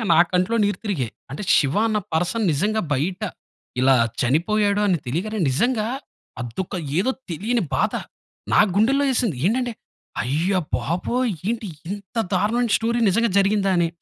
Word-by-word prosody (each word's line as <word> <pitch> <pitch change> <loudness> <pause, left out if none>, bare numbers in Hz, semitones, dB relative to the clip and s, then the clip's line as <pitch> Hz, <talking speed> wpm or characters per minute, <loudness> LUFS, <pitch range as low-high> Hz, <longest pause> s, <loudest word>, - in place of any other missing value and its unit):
నిజంగా - - -2
నా - - +5
కంట్లో 185 +6 +2
నీరు 205 0 0
తిరిగాయి. 140 - -1 0.2
అంటే 145 - -5
శివ 140 0 +2
అన్న 215 -1 +1
పర్సన్ 180 +7 0
నిజంగా 210 +9 +1
బయట 175 +8 -1 0.6
ఇలా 135 +1 +5 0.3
చనిపోయాడు 200 - +2
అని 180 -4 +2
తెలియగానే, 195 - -2
నిజంగా 220 - +1 0.5
అదొక 120 +12 -5 0.2
ఏదో 255 +8 +2 0.2
తెలియని 220 +7 0
బాధ. - - +1 0.6
నా - - +6
గుండెల్లో 270 +7 +3
యేసింది. 230 - 0
ఏంటంటే 245 +2 +1 0.5
అయ్య 155 +10 0 0.3
బాబోయ్! 190 - -1 0.2
ఏంటి 225 -3 -3 0.2
ఇంత 200 0 -8 0.2
దారుణమైన 225 +4 +1
స్టోరీ 235 +1 0
నిజంగా 230 +3 +2
జరిగిందా 195 0 +2
అని. 170 -1 +2
200 Hz, 140 wpm, -22 LUFS, 170-225 Hz, 0.6 s, నా